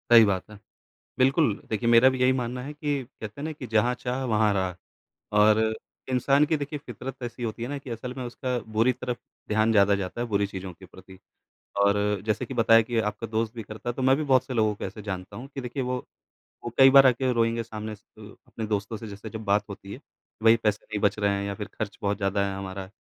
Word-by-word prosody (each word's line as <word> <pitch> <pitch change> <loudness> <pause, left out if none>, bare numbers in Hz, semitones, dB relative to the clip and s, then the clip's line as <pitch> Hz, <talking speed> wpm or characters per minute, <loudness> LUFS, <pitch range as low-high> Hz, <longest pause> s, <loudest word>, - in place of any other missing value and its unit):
सही 115 -2 +9
बात 95 -1 -1
है। 105 - -11 0.6
बिल्कुल, 135 -1 +3 0.2
देखिए, 115 +2 0
मेरा 120 +2 +7
भी 130 -1 -3
यही 130 0 +5
मानना 125 +1 -3
है 145 +3 -6
कि 145 -2 -2
कहते 115 -1 -10
हैं - - -5
ना 160 - -2
कि 145 -4 -8
जहाँ 115 +2 +2
चाह 125 +2 -3
वहाँ 105 -1 +3
राह। 95 -2 0 0.7
और 105 +1 +6 0.5
इंसान 135 +3 +3
की 160 - +1
देखिए, 145 +1 -4
फितरत 130 0 -8
ऐसी 120 +1 -6
होती 115 0 -4
है 120 - -3
ना 145 +1 -3
कि 135 -2 -10
असल 120 +2 -5
में 130 - -4
उसका 125 +1 -3 0.2
बुरी 115 +4 +4
तरफ 125 -1 -4 0.3
ध्यान 110 +1 +2
ज़्यादा 100 -1 +5
जाता 100 +4 -4
है, 120 - -1
बुरी 100 -3 +1
चीज़ों 95 -1 -7
के 95 +2 -15
प्रति। 95 +1 -15 0.6
और 100 0 +4 0.3
जैसे 110 +3 0
कि - - -7
बताया 115 0 +6
कि 120 -2 0
आपका 105 +2 -7
दोस्त 110 0 -1
भी 115 - -5
करता 110 +3 -7
है, - - -1
तो 130 - -5
मैं 130 +1 +5
भी 155 - -1
बहुत 130 -3 +4
से 130 - -5
लोगों 110 -3 +2
को - - -5
ऐसे 110 - -7
जानता 95 -3 -6
हूँ 130 - -8
कि 135 - -3
देखिए 125 +2 -3
वो 125 0 -1 0.7
वो 120 - -3
कई 135 0 +9
बार 135 0 +8
आके 130 +1 +2
रोएँगे 115 0 +1
सामने 110 -1 -6
से 105 +1 -16
अ, - - -16
अपने 110 - -5
दोस्तों 105 +1 -2
से 110 - -8
जैसे 105 +2 -8
जब 110 +1 -7
बात 100 +1 +3
होती 100 0 -8
है, - - -9 0.4
वही 115 0 +7
पैसे 105 -1 0
नहीं 105 -1 -4
बच 100 - +2
रहे 100 -1 +2
हैं 100 - -2
या 100 - -2
फिर 105 -1 -6
खर्च 105 -2 -5
बहुत 100 0 0
ज़्यादा 100 0 0
है 100 - -4
हमारा 95 0 -6
115 Hz, 245 wpm, -26 LUFS, 105-125 Hz, 0.7 s, सही